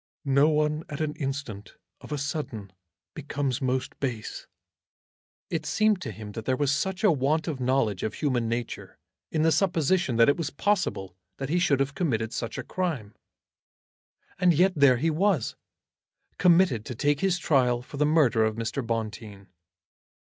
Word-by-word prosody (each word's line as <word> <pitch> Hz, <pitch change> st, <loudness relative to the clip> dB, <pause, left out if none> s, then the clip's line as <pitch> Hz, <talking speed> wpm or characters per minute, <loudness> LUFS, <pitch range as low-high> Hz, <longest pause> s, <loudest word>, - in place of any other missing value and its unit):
"No 140 Hz, +2 st, +4 dB
one 150 Hz, 0 st, +1 dB
at 145 Hz, -, -6 dB
an 155 Hz, -1 st, -1 dB
instant, 135 Hz, -, -5 dB, 0.2 s
of -, -, -13 dB
a 150 Hz, -, -1 dB
sudden, 140 Hz, -9 st, -4 dB, 0.4 s
becomes 140 Hz, -2 st, -3 dB
most 130 Hz, 0 st, -2 dB
base." 120 Hz, -6 st, -4 dB, 1.0 s
It -, -, -1 dB
seemed 215 Hz, -3 st, +2 dB
to -, -, -4 dB
him 105 Hz, -1 st, -8 dB
that 110 Hz, +1 st, -7 dB
there 130 Hz, -1 st, +1 dB
was 145 Hz, 0 st, +1 dB
such 190 Hz, +7 st, -2 dB
a 210 Hz, -, +6 dB
want 150 Hz, +3 st, 0 dB
of 150 Hz, -5 st, -3 dB
knowledge 125 Hz, -6 st, +1 dB
of 110 Hz, -, -3 dB
human 125 Hz, -6 st, 0 dB
nature 115 Hz, 0 st, -5 dB, 0.3 s
in 155 Hz, -, 0 dB
the 160 Hz, -, +4 dB
supposition 170 Hz, -4 st, +1 dB
that 115 Hz, 0 st, +5 dB
it 140 Hz, -, +3 dB
was 165 Hz, -4 st, -2 dB
possible 145 Hz, -, -1 dB, 0.2 s
that 135 Hz, -1 st, -4 dB
he 175 Hz, +3 st, +2 dB
should 145 Hz, -6 st, +2 dB
have 135 Hz, +1 st, 0 dB
committed 120 Hz, -, -1 dB
such 115 Hz, -, -4 dB
a -, -, -4 dB
crime. 145 Hz, -, -3 dB, 1.3 s
And 180 Hz, -3 st, +4 dB
yet 185 Hz, +4 st, +4 dB
there 140 Hz, -4 st, +5 dB
he 160 Hz, +6 st, +1 dB
was, 170 Hz, -, +1 dB, 0.8 s
committed 175 Hz, -, +4 dB
to 125 Hz, -, -6 dB
take 145 Hz, +4 st, +1 dB
his 190 Hz, -2 st, +1 dB
trial 125 Hz, -7 st, +2 dB
for 140 Hz, -, -10 dB
the 150 Hz, -, +2 dB
murder 145 Hz, -8 st, +3 dB
of 110 Hz, -1 st, 0 dB
Mr. 115 Hz, +3 st, -3 dB
Bonteen. 110 Hz, -4 st, -5 dB
140 Hz, 170 wpm, -27 LUFS, 115-160 Hz, 1.3 s, a